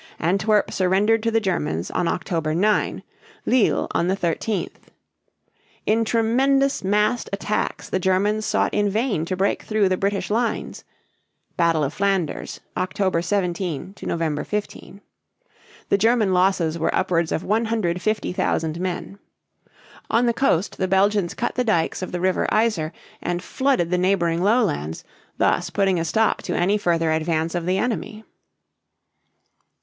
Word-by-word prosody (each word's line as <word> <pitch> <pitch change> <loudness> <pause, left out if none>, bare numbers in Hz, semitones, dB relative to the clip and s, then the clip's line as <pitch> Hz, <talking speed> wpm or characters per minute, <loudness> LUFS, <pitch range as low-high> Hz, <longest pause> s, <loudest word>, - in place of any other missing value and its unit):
Antwerp 200 +5 +1
surrendered 200 +4 +2
to 230 - +1
the 225 0 +2
Germans 160 - -2
on 180 - 0
October 165 -2 -1
9; 210 +4 +1 0.4
Lille 250 -4 +3
(leel) - - -2
on 170 - 0
the 190 +1 +1
13th. 180 +3 -3 1.0
In 225 +1 +2
tremendous 265 +5 +2
massed 210 +5 +1
attacks 205 +1 -2
the 190 - -1
Germans 200 +4 +1
sought - - 0
in 205 -1 +2
vain 215 -5 0
to 185 +2 -3
break 195 +2 +1
through 215 -3 +1
the 185 - +1
British 195 -1 -1
lines 230 0 -1 0.7
(Battle 165 -2 +2
of 140 +2 -2
Flanders, 195 -5 -1
October 185 -1 0
17 180 -2 -2
to - - -11
November 160 -3 -1
15). 210 -1 -5 0.9
The - - +4
German 220 -2 +3
losses 180 -3 +2
were 160 - 0
upwards 170 -3 +1
of 160 - -1
150,000 205 -6 -1
men. 185 +2 -4 0.9
On 235 +2 +3
the 235 - +2
coast 225 -8 0
the 190 - +1
Belgians 195 -1 +2
cut 240 - -2
the 250 - 0
dikes 180 -8 0
of 185 - -5
the 180 - -3
river 185 +1 +1
Yser 215 -8 +2
(ī´ser) - - -21 0.3
and 175 0 -2
flooded 260 -11 0
the 180 - +2
neighboring 175 -3 +1
lowlands, 195 - +1 0.3
thus 175 0 +1
putting 190 -1 +1
a 165 - -1
stop 220 +7 +1
to - - -3
any 195 +4 +2
further 165 -4 +1
advance 160 +1 0
of 175 -1 -3
the 185 +1 +2
enemy. 220 -1 -3
190 Hz, 145 wpm, -22 LUFS, 170-215 Hz, 1.0 s, The